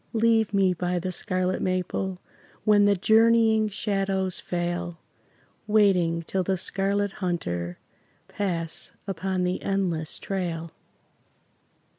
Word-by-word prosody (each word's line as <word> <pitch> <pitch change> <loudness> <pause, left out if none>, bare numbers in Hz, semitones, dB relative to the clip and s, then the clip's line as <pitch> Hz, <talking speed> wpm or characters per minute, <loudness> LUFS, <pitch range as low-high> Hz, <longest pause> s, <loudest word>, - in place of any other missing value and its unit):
Leave 225 -2 +3
me 195 -2 +3
by 180 +1 -1
the 185 +1 -2
scarlet 185 -1 -1
maple, 185 0 -2 0.4
When 205 -1 +5
the 205 0 +4
journeying 220 +2 +4
shadows 195 -2 -1
fail, 175 -1 -3 0.7
Waiting 185 -6 +3
till 190 +3 -1
the 190 +1 0
Scarlet 200 +2 0
Hunter 90 - -2 0.5
Pass 180 -5 -3
upon 190 -1 -2
the 180 0 -1
endless 175 -5 -1
trail. 170 -4 -3
190 Hz, 105 wpm, -26 LUFS, 175-200 Hz, 0.7 s, When